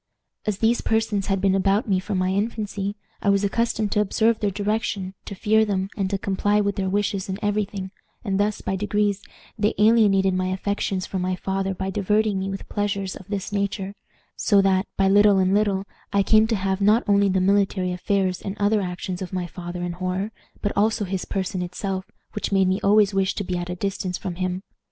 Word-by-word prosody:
As 210 -2 0
these 230 +3 +2
persons 220 -3 0
had 195 -1 +1
been 195 0 +2
about 195 +3 +2
me 190 -3 +2
from 195 +1 -3
my 185 0 +1
infancy, 205 0 -2 0.3
I 200 - +1
was 200 0 +3
accustomed 215 0 0
to - - +2
observe 220 +2 +2
their 205 - +1
directions, 205 -1 -2
to 200 - -6
fear 220 +3 +3
them, 195 -2 -1
and 195 -3 -1
to 200 - 0
comply 205 +2 +1
with 200 -1 0
their 190 -1 -1
wishes 200 -1 -1
in 190 - -2
every 205 0 +1
thing, 190 -1 -7 0.3
and 195 -3 -1
thus, 210 +1 0
by 195 - -2
degrees, 205 0 0 0.4
they 210 +1 +1
alienated 205 -3 +4
my 185 0 0
affections 190 0 -1
from 190 - -3
my 185 0 0
father 195 +1 -2
by 190 +1 -3
diverting 210 0 +1
me 190 +1 -2
with 195 0 -6
pleasures 200 -2 -2
of 190 - -11
this 200 -1 -4
nature; 200 -1 -2 0.4
so 205 -3 +3
that, 190 0 +3
by 195 - +3
little 205 +1 +6
and 190 0 +3
little, 200 -2 +1 0.3
I 200 -1 +3
came 215 +2 +5
to 225 - +1
have 190 0 -1
not 210 +4 +4
only 200 -1 +4
the 190 0 +2
military 195 -1 +2
affairs 185 0 0
and 195 +1 -5
other 205 +1 +2
actions 180 0 -4
of 185 - -5
my 185 -2 -2
father 175 0 -6
in 175 - -2
horror, 185 +4 -3 0.3
but 205 - 0
also 215 +1 +2
his 190 0 -3
person 190 -1 -2
itself, 190 +2 -4 0.2
which 210 - -3
made 195 -1 +3
me 185 +1 +1
always 205 0 +4
wish 195 0 +1
to 205 - -2
be 180 -1 -3
at 175 0 -3
a 180 - -3
distance 185 -1 -2
from 180 -3 -5
him. 185 +1 -2
195 Hz, 210 wpm, -24 LUFS, 190-205 Hz, 0.4 s, little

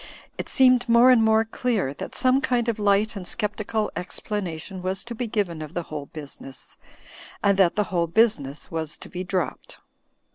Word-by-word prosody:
It - - -6
seemed 255 -2 +4
more 235 +2 +7
and 245 -3 +5
more 220 0 +4
clear 220 - -1
that - - -7
some 255 +1 +3
kind 245 -3 0
of 230 -2 -1
light 210 +2 +2
and 195 - -5
scep 210 +2 -2
tical 215 0 -2
explanation 185 -1 -5
was 185 +1 -1
to 235 - -7
be 235 +1 -3
given 195 -7 -2
of 155 +2 -8
the 175 - -1
whole 145 -2 -5
business, 140 -3 -9 0.7
and 200 -1 +4
that 180 -3 +4
the 210 - +2
whole 170 -1 +2
business 165 - +1
was 160 -2 -3
to - - -9
be 180 +1 -5
dropped. 180 -6 -3
205 Hz, 185 wpm, -24 LUFS, 170-230 Hz, 0.7 s, more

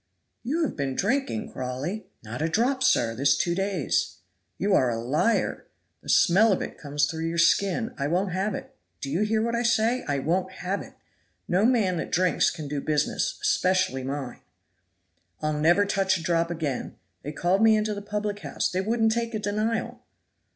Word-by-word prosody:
"You 305 +8 -1
have 310 - -2
been 135 -3 -2
drinking, 230 - -1
Crawley!" 130 +11 -4 0.2
"Not 115 +5 -6
a 160 - +1
drop, 250 +9 +1
sir, 115 - +3
this 140 +4 +2
two 170 - 0
days." 190 -5 -1 0.4
"You 200 +1 +1
are 130 -9 +4
a 115 - -1
liar! 150 - 0 0.3
The - - -11
smell 205 +6 +5
of 190 - +1
it - - -8
comes 145 -1 0
through 160 +2 -3
your 165 +1 -3
skin. 200 +7 +2
I 140 - 0
won't 180 +4 0
have 190 +2 -1
it. 265 0 -9 0.2
Do 135 - -5
you 170 +7 0
hear 215 +1 +1
what 235 0 -1
I 235 - +1
say? 235 +1 +2
I 145 -1 0
won't 180 +7 -1
have 195 +3 -3
it. - - -11 0.5
No 190 +4 +2
man 215 -8 +2
that - - -4
drinks 180 +1 +3
can 155 -4 -6
do 140 0 -3
business 150 0 0
especially 185 -8 +1
mine." 135 -1 -5 1.0
"I'll 155 0 -1
never 170 +7 +3
touch 195 -1 +1
a 165 - -7
drop 170 -1 +1
again. 155 -6 -3 0.3
They 150 - -5
called 180 +6 +1
me 220 -1 +6
into 215 0 0
the 205 - -5
public 205 0 -3
house - - -2
they 185 0 0
wouldn't 225 +2 +1
take 230 0 -2
a - - -1
denial." 215 +2 -2
185 Hz, 190 wpm, -26 LUFS, 150-215 Hz, 1.0 s, me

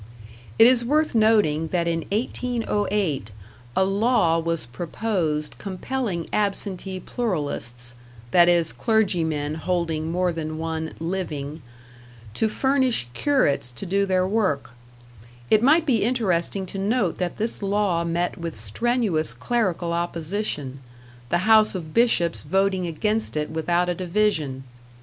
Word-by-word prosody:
It - - +8
is 245 0 +5
worth 305 +5 +1
noting 210 -9 +3
that 170 0 0
in 165 -1 -1
1808 210 - -1 0.5
a 190 - +3
law 195 -4 +2
was 165 -4 -2
proposed 160 - -2
compelling 195 -2 -3
absentee 195 -2 -2
pluralists 145 - -3 0.4
that 175 -1 +6
is, 170 -2 +2
clergymen 165 -10 0
holding 165 -2 -1
more 180 +1 +1
than 155 -1 -4
one 160 0 -4
"living" 160 -4 -4 0.7
to 220 - +1
furnish 260 - +1
curates 145 - +1
to 120 - -3
do 200 +2 +1
their 185 -1 +2
work; 190 - 0 0.8
it 215 - +6
might 305 +6 +5
be 240 -8 +2
interesting 195 -5 0
to 195 +2 -6
note 200 -2 0
that 180 -2 -2
this 220 +1 -1
law 200 -4 +1
met 170 +1 -1
with 165 -2 -5
strenuous 185 - 0
clerical 185 -8 -1
opposition, 170 -4 -3 0.5
the 175 +4 +1
house 215 -2 +5
of 160 -4 -6
Bishops 230 -8 +2
voting 190 -1 +1
against 210 +3 -1
it 150 0 -2
without 170 +2 0
a 180 - +1
division. 170 -7 0
180 Hz, 125 wpm, -24 LUFS, 160-215 Hz, 0.8 s, It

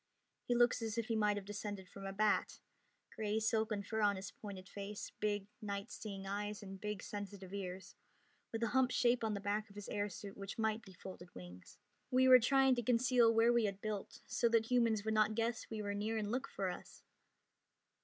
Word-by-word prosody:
He 245 - +2
looks 240 0 +4
as 225 0 -2
if 230 0 -1
he 225 - +1
might 210 -1 +2
have 200 - -5
descended 205 -2 -5
from 195 +1 -8
a - - -3
bat 210 +1 +1 0.6
gray 215 0 0
silken 220 -2 +1
fur 220 +2 -2
on 205 -1 +4
his 190 -1 -6
pointed 195 -3 -8
face, 200 +1 -6
big 205 -1 0 0.2
night 200 -1 -4
seeing 195 -3 -6
eyes, 205 +2 -3
and 195 -1 -8
big 210 -2 -3
sensitive 200 -3 -6
ears, 190 -2 -5 0.6
with 225 0 -2
a 230 - +2
humped 255 +1 +3
shape 240 -1 +3
on 215 -1 0
the - - -3
back 205 +2 -1
of 200 - -16
his 205 -1 -7
air 205 0 -1
suit 200 +1 -8
which 195 0 -6
might 220 0 +1
be 190 - -14
folded 180 0 -10
wings. 90 0 -11 0.3
"We 260 +1 +4
were 255 -1 +10
trying 270 +2 +5
to - - +1
conceal 240 0 +4
where 230 +1 +5
we 235 -2 +4
had 200 -1 -2
built, 210 -1 -4
so 235 - +1
that 230 0 +2
humans 230 -4 +3
would 220 - +1
not 215 0 +3
guess 230 0 -1
we 220 -1 -4
were 205 0 -2
near 215 +2 -1
and 210 -1 -2
look 260 +3 -1
for 190 -2 -2
us." - - -10
210 Hz, 215 wpm, -37 LUFS, 200-230 Hz, 0.6 s, were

